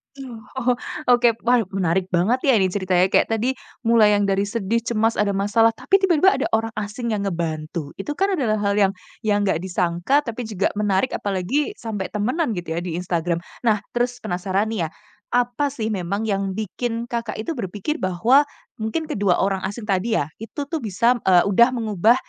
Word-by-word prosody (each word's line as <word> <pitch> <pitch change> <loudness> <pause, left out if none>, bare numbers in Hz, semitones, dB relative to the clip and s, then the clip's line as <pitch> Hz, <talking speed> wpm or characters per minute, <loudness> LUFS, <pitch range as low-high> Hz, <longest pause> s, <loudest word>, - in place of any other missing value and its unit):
Oh 255 -5 -9 0.2
oh, 250 -1 +2 0.4
oke, 240 -2 +4
wah 245 +1 +4 0.2
menarik 185 0 +1
banget 190 +8 +2
ya 265 - +6
ini 190 -3 +2
ceritanya 185 -1 +1
kayak - - +4
tadi, 240 +4 0 0.3
mulai 220 -3 +5
yang 205 - +2
dari 200 0 +1
sedih 225 +1 -1
cemas 225 0 0
ada 200 -1 +1
masalah, 225 +3 +3
tapi 390 +9 +2
tiba-tiba 380 0 +4
ada - - 0
orang 225 0 -1
asing 220 +3 -4
yang 200 -2 -1
ngebantu, 160 -3 -3
itu 295 +9 -4
kan 390 +2 +1
adalah 250 - +1
hal 200 +1 +1
yang 195 -1 +3 0.3
yang 205 -1 +2
nggak 190 -4 +1
disangka 180 +9 0
tapi 235 -2 -5
juga 200 -2 0
menarik 205 +3 +1
apalagi, 205 - -1
sampai 210 - -4
temenan 235 - -1
gitu 170 -2 -5
ya 165 - -1
di 175 -2 -4
Instagram. 170 -1 -1 0.2
Nah, 210 -2 +2
terus 245 +1 0
penasaran 190 +4 -1
nih 175 -7 -1
ya, - - -12 0.5
apa 245 +4 +1
sih 225 -5 -3
memang 200 +2 -2
yang 195 -3 -1
bikin, 230 +3 -4
Kakak, 230 -2 -3
itu 220 +9 -4
berpikir 215 - -3
bahwa 230 +11 +3 0.3
mungkin 220 +9 -2
kedua 200 -6 +2
orang 190 -1 0
asing 210 +3 -7
tadi 210 +2 0
ya 145 +2 -1
itu 230 +6 -5
tuh 305 +3 -3
bisa 230 +3 +1
eee, 180 -2 +6
udah 235 +6 +4
mengubah 220 0 +3
210 Hz, 185 wpm, -22 LUFS, 190-240 Hz, 0.5 s, ya